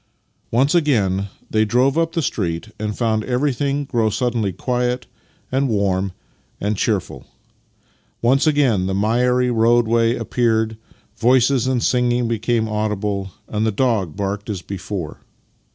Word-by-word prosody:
Once 130 +5 +2
again 105 - +2 0.2
they 110 0 +2
drove 125 +6 +2
up 165 0 +1
the 165 - 0
street 90 -4 -2
and 105 0 -3
found 110 -2 +1
ever3'thing 140 +2 -1
grow 115 -4 +1
suddenly 115 -3 -1
quiet 125 +5 -1 0.5
and 135 +1 +1
warm 100 -3 0 0.5
and 105 +1 -1
cheerful. 105 -2 -2 0.9
Once 135 +6 +3
again 130 -11 +2
the 95 - -1
miry 125 +4 +2
roadway 115 0 +3
appeared, 110 -3 0 0.4
voices 125 +1 +3
and 130 -2 0
singing 125 -1 +2
became 115 0 0
audible, 105 -2 -2 0.2
and 105 0 -2
the 110 - +2
dog 105 - 0
barked 100 +1 -3
as 95 -4 -4
before. 95 -4 -5
115 Hz, 130 wpm, -20 LUFS, 105-125 Hz, 0.9 s, Once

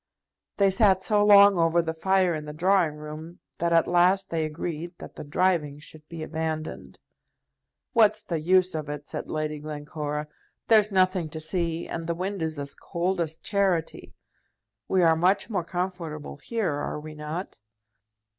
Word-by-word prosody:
They 195 -1 +4
sat 190 -2 +4
so 210 -1 +3
long 200 -2 +7
over 165 +1 +3
the 160 -1 -1
fire 185 +1 +2
in 155 -1 -4
the 150 - -7
drawing 175 -1 +2
room 155 +3 -9 0.2
that 170 0 0
at 165 -1 +4
last 185 +2 +3
they 160 -1 0
agreed 170 +2 -5
that - - -11
the - - -7
driving 150 -1 0
should 155 0 -12
be 165 -2 -6
abandoned. 155 0 -5 0.9
"What's 215 -3 +4
the 165 -2 -2
use 185 +3 +3
of 155 -2 -4
it?" 145 -1 -6
said - - -6
Lady 155 -1 -3
Glencora. 150 0 -5 0.4
"There's 215 -2 +5
nothing 185 -3 +2
to 160 - -6
see, 165 +1 -2
and 165 -1 -5
the 170 - -1
wind 190 +2 -3
is 160 -1 -2
as 140 0 -4
cold 175 +1 -2
as 160 -1 -3
charity. 190 -5 -1 0.7
We 185 -2 +2
are 165 -1 +5
much 185 +7 +1
more 185 -5 0
comfortable 175 -5 -5
here; 210 -1 -2
are 145 +1 -3
we 155 +1 -9
not?" 155 - -6
170 Hz, 165 wpm, -26 LUFS, 155-185 Hz, 0.9 s, long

